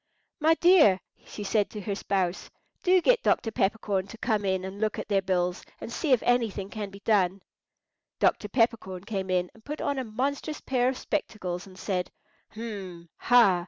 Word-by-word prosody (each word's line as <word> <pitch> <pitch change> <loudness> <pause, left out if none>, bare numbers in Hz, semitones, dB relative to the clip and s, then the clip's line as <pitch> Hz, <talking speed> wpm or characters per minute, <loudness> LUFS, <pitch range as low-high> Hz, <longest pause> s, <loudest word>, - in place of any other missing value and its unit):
"My 320 +1 +4
dear," 330 - +6 0.3
she 205 - -7
said 205 0 +1
to 210 - -7
her 200 +1 -3
spouse, 190 -2 -1 0.3
"do 365 0 +4
get - - +4
Dr. 225 - +1
Peppercorn 195 -2 0
to 225 - -10
come 215 -3 0
in 190 -1 0
and 195 +2 -7
look 215 -1 0
at - - -5
their 195 -2 +3
bills, 180 -1 0 0.2
and 235 - -7
see 310 - -1
if 250 - +4
anything 220 -5 0
can 205 0 -4
be 200 0 -13
done." 195 -3 +2 0.7
Dr. 210 - +2
Peppercorn 225 -6 0
came 195 -2 -4
in, 180 -1 0
and 225 - -20
put 300 +4 -6
on 280 -1 -1
a - - -2
monstrous 275 +7 -2
pair 250 -1 +1
of 260 - -3
spectacles, 185 -11 -3
and 185 -1 -14
said, 185 -3 -2 0.5
"Hum! 195 -7 -7
ha! 230 -7 +5
210 Hz, 185 wpm, -27 LUFS, 190-245 Hz, 0.7 s, dear